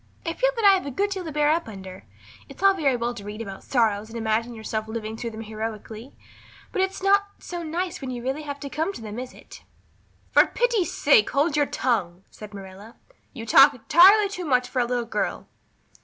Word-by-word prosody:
I 330 - -1
feel - - +2
that 455 -3 -1
I 400 - +8
have 370 -6 -1
a - - -2
good 400 +10 -1
deal 380 -2 -3
to 320 - -6
bear 300 0 +2
up 330 -2 0
under. 190 -3 -10 0.4
It's - - -11
all 390 0 +6
very 290 -8 +1
well 240 0 -2
to 205 - -9
read 210 +1 -7
about 195 -4 -7
sorrows 220 -4 0
and 230 - -7
imagine 225 +1 -1
yourself 220 0 -4
living 220 -1 -5
through 235 +1 -5
them 220 0 -8
heroically, 220 +2 -7 0.6
but 380 - -1
it's 380 0 -2
not 400 +1 +4
so 350 -1 -7
nice 345 +2 -4
when 265 - -5
you 245 -2 -5
really 265 +4 -2
come 285 -1 -6
to 280 - -6
have 320 +6 -1
them, 215 +2 -6
is 255 0 -7
it?" - - -14 0.7
"For - - +6
pity's 475 -7 0
sake 445 -4 +4
hold 290 +2 +1
your 290 -1 +2
tongue," 195 -8 -1
said 210 -1 -11
Marilla. 200 +2 -11 0.4
"You 230 -4 -7
talk 275 +5 +7
entirely 380 - +6
too 385 -2 -6
much 250 -4 +2
for 260 - -3
a 245 - +2
little 240 0 -2
girl." 230 - -3
250 Hz, 215 wpm, -24 LUFS, 220-340 Hz, 0.7 s, I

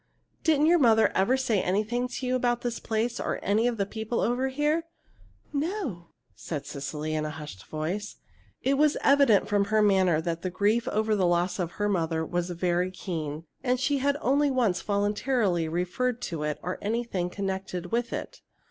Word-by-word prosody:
Didn't 305 -2 +4
your 345 +2 +5
mother 225 -5 +5
ever 195 +8 +3
say 235 -7 +1
anything 215 +7 0
to 250 +1 -5
you 255 0 +1
about 240 -1 +1
this 240 -1 -3
place 230 +2 -1
or - - -2
any 215 +4 +2
of 240 -2 -1
the 200 - +1
people 220 +3 -3
over 245 +3 +1
here?" 300 +5 0 0.7
"No," 285 - -3 0.3
said 145 -4 -5
Cecily, 150 +2 -4
in 155 0 0
a 155 - -2
hushed 150 -12 -8
voice. 160 +7 -3 0.5
It 275 +1 +2
was 300 0 +4
evident 275 -7 +5
from 205 -1 +2
her 215 +1 +2
manner 190 -5 +4
that 165 0 -3
her 185 - -1
grief 205 +5 +1
over 215 0 +1
the 190 -3 +2
loss 175 +1 +1
of 175 -2 -2
her 205 - -1
mother 165 -4 0
was 175 +1 -2
very 175 +1 0
keen, 165 -4 -5 0.2
and 250 -1 +1
she 280 +2 +1
had 280 +1 +1
only 285 +3 +3
once 235 -10 +1
voluntarily 205 -3 +1
referred 180 +9 -1
to 165 -3 -3
it 150 0 -1
or 180 +2 -3
to - - -17
anything 210 -4 -1
connected 190 -2 -4
with 235 +1 0
it. - - -6
205 Hz, 185 wpm, -27 LUFS, 175-245 Hz, 0.7 s, your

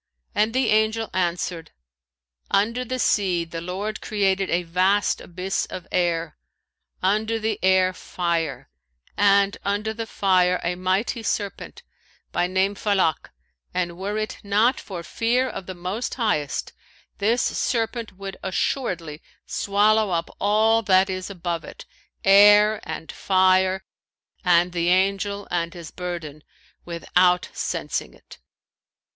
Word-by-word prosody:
and 215 +3 +1
the 260 -2 +2
Angel 220 +1 +1
answered, 175 -2 -2 0.8
'Under 230 +5 +1
the 255 +1 -3
sea 185 -7 +1
the 165 0 -6
Lord 195 +5 -4
created 195 -2 0
a 175 +1 +1
vast 185 +4 +1
abyss 185 +2 -3
of 180 - -7
air, 170 -3 0 0.6
under 215 +4 +1
the 220 -1 -2
air 185 0 +4
fire, 170 -7 -2 0.5
and 200 0 +3
under 205 +2 -1
the 225 0 -5
fire 180 -4 +2
a 175 - 0
mighty 185 +6 -1
serpent, 200 -2 -4 0.5
by 175 - +1
name 190 +2 +1
Falak; 195 -6 0 0.5
and 175 -2 -1
were 200 +4 -3
it 215 0 -3
not 220 +8 +2
for 180 - -7
fear 240 +8 0
of 195 -6 -7
the 185 - -6
Most 185 +7 -4
Highest, 210 - -1 0.5
this 230 +5 +2
serpent 230 -2 -1
would 195 +1 -8
assuredly 180 - -2 0.2
swallow 210 +1 +2
up 170 -2 -2
all 220 +2 +3
that 190 -2 +3
is 185 +1 -4
above 175 -3 -4
it, - - -11 0.4
air 205 +2 +7
and 160 - -5
fire 190 0 +2 0.6
and 175 -1 +4
the 170 -1 -1
Angel 195 +2 +1
and 170 0 -1
his 170 -3 -9
burden, 170 -5 -6 0.4
without 180 +1 +2
sensing - - -3
it.'" - - -16
190 Hz, 130 wpm, -23 LUFS, 180-210 Hz, 0.8 s, air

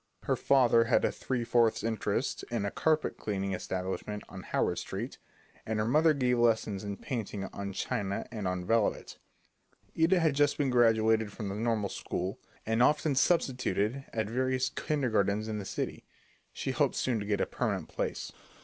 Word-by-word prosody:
Her - - +1
father 120 -4 +4
had - - +3
a - - +1
three 125 -3 -2
fourths 115 -2 +2
interest 110 -3 -1
in 115 -4 -1
a 100 - -2
carpet 155 -1 +1
cleaning 100 -2 -2
establishment 95 +3 -4
on 95 - -9
Howard - - 0
Street, - - -5 0.4
and 110 0 -2
her 105 - +1
mother 155 +5 +4
gave 125 -3 +1
lessons 110 -4 +2
in 100 -1 -4
painting 110 -6 -4
on 100 0 -4
china 100 -1 -2
and 105 -5 -3
on 90 -1 -2
velvet. 115 +1 0 0.8
Ida 170 +3 +4
had 160 -3 +3
just 145 +1 +2
been 140 -3 +1
graduated 110 -3 +3
from 105 -1 -5
the 100 - -4
normal 110 -2 0
school, 95 +3 -4 0.3
and 115 +1 +1
often 150 +3 +3
substituted 130 - +1
at 110 -2 -1
various 130 +2 0
kindergartens 110 -9 0
in 110 -1 -3
the 100 - -6
city. - - -4 0.5
She - - -3
hoped - - +1
soon 120 -4 0
to 100 - -4
get 105 -1 +1
a - - +2
permanent - - -2
place. - - -3
115 Hz, 170 wpm, -30 LUFS, 100-130 Hz, 0.8 s, father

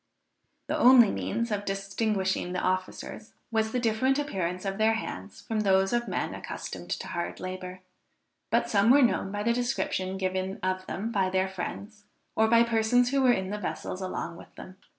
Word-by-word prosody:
The - - -2
only 245 -4 +7
means 235 +2 -2
of 205 -1 -1
distinguishing 195 -2 -1
the 180 - -1
officers 185 +3 -3 0.2
was 220 -1 +1
the 250 - 0
different 245 +4 +2
appearance 185 - -2
of 195 +1 -3
their 220 +1 +4
hands 95 - -6
from 220 -1 -2
those 195 -1 +3
of 240 0 0
men - - -2
accustomed - - -7
to - - -3
hard 170 - -4
labor; 185 0 -6 0.7
but - - +2
some 205 +1 +3
were 275 +2 +7
known 210 -5 +1
by 205 +1 -3
the 235 +2 +2
description 215 -6 -1
given 190 0 -2
of 185 0 -1
them 220 +4 -3
by 195 -4 +1
their 190 0 +1
friends 205 +3 -7 0.3
or 220 - +4
by 230 +1 +6
persons 235 +2 +2
who 275 -1 +2
were 255 -2 +5
in 190 -4 -1
the 210 - -3
vessels 185 -1 -4
along 170 -2 -4
with - - -15
them. 185 0 -11
200 Hz, 185 wpm, -28 LUFS, 185-230 Hz, 0.7 s, only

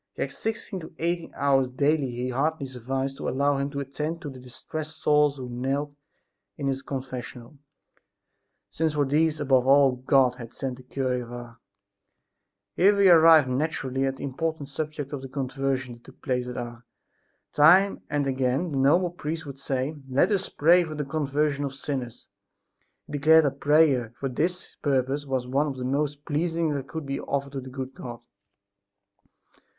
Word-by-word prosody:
Yet - - -2
sixteen 220 -3 -4
to 160 -1 -11
eighteen 170 +1 -2
hours 135 -2 +2
daily 130 -2 0
hardly 140 +3 -1
sufficed 135 +2 -4
to - - -3
allow 140 +1 +1
him 140 +1 -1
to 140 0 -4
attend 150 +4 -4
to 145 - -5
the 130 - -11
distressed 155 +5 -7
souls 150 -1 +3
who 130 -2 -6
knelt 135 +4 -2 0.6
in 140 - -4
his 135 -1 -1
confessional, 130 -1 -7 1.1
since 160 -1 0
for 145 -1 +2
these 155 +3 +1
above 130 -3 +3
all 140 0 +6
God 130 -1 +3
had 115 -2 -9
sent 130 -2 -4
the - - -12
cure 125 -1 -2
of 120 0 -9
Ars. 120 -1 -9 1.2
Here 200 +3 +5
we 195 -2 +6
arrive 160 -4 +7
naturally 135 -1 -1
at 135 0 -3
the - - -8
important 145 +1 -3
subject 150 -1 -5
of 140 - -4
the 135 - -8
conversions 135 -2 -2
that - - -29
took 130 - -16
place 125 -3 -1
at 125 - -6
Ars. 120 0 -6 0.7
Time 180 +7 +5
and 145 -1 0
again 135 +5 0
the 135 - -1
noble 170 +6 +3
priest 160 -1 -5
would 140 -1 -9
say: 135 +2 -2
"Let 130 +10 +3
us 195 -2 0
pray 175 +4 +4
for 155 -2 -6
the 150 -1 -3
conversion 145 0 0
of 135 -1 -4
sinners!" 130 -4 -5 0.8
He - - -12
declared 160 +2 +6
that 140 0 -2
prayer 145 -6 +3
for 135 - -2
this 175 +8 -3
purpose 140 +1 0
was 130 -2 -1
one 140 +4 +1
of 135 -2 -4
the 125 - -4
most 145 +2 -1
pleasing 165 +1 0
that 135 -2 -4
could 160 +3 -5
be 140 0 -3
offered 140 0 -3
to 135 -1 -5
the 130 - -9
good 130 0 -6
God. 120 -3 -8
140 Hz, 175 wpm, -26 LUFS, 130-150 Hz, 1.2 s, arrive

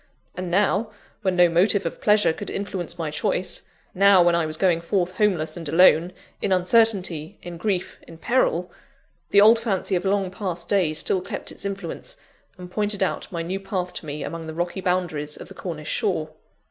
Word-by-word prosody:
And 180 -1 -5
now, 205 +4 +2 0.3
when 190 -3 0
no 180 0 +6
motive 190 +4 +3
of - - -4
pleasure 210 -5 +4
could 205 - -7
influence 185 -4 -4
my 160 -3 -3
choice 180 +4 -1 0.3
now, 195 -1 +6
when 175 0 +4
I 170 -2 +1
was 155 0 -5
going 175 -2 +2
forth 180 +1 0
homeless 185 -5 0
and 165 -4 -6
alone, 170 +1 +5 0.3
in 200 - -1
uncertainty, 185 -4 +2
in 175 -1 -7
grief, 185 0 -2
in 165 - -12
peril 180 -5 +1 0.6
the 200 - +6
old 225 +2 +7
fancy 205 -4 -1
of 175 - -1
long 195 -1 0
past 180 -3 -4
days 175 -6 +1
still 185 - 0
kept 185 - -6
its - - -8
influence, 195 - -5 0.4
and 180 -1 -10
pointed 205 0 0
out 190 - -3
my 170 -2 -3
new 185 +3 -3
path 190 -2 -3
to 155 - -6
me 145 0 -4
among 165 -1 -6
the 160 - -6
rocky 175 +3 -2
boundaries 175 -5 -1
of - - -10
the - - -10
Cornish 155 -4 -6
shore. 180 -8 -1
180 Hz, 190 wpm, -24 LUFS, 170-200 Hz, 0.6 s, old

